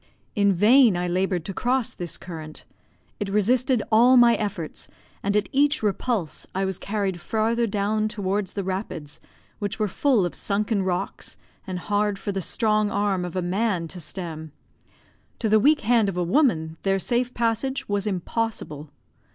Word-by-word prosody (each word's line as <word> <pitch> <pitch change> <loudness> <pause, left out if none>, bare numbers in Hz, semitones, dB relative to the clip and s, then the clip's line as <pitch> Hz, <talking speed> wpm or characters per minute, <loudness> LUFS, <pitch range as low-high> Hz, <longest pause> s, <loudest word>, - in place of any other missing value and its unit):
In 200 -2 +4
vain 215 +2 +5
I 180 0 -1
laboured 180 -1 0
to 195 - -4
cross 250 +3 0
this 175 -2 -4
current; 160 -3 -9 0.5
it 205 -2 -2
resisted 235 +4 +2
all 245 +4 +6
my 240 -1 +7
efforts, 200 -8 -4 0.3
and 200 +1 +1
at 210 - 0
each 285 -1 +2
repulse 205 - -1
I 195 +1 +1
was 190 -1 -3
carried 200 -4 -2
farther 230 +3 0
down 210 +1 0
towards 200 -2 -2
the 200 - -3
rapids, 180 -6 -5 0.4
which 205 -2 -3
were 215 - 0
full 230 0 +2
of 175 - -3
sunken 205 +1 0
rocks, 185 -1 -3 0.3
and 185 -1 -3
hard 205 +2 0
for 200 - -4
the 195 -1 -2
strong 215 +2 +1
arm 200 -3 0
of 180 0 -6
a 185 - -1
man 185 -1 0
to 180 - -8
stem 160 -1 -6 0.9
to 225 - -1
the 215 0 +5
weak 295 +7 +4
hand 225 -2 +3
of 185 - -5
a 180 - +1
woman 170 - +1
their 195 0 +1
safe 245 +5 -1
passage 235 +3 -1
was 205 0 -1
impossible. 185 -6 -3
205 Hz, 165 wpm, -24 LUFS, 180-225 Hz, 0.9 s, my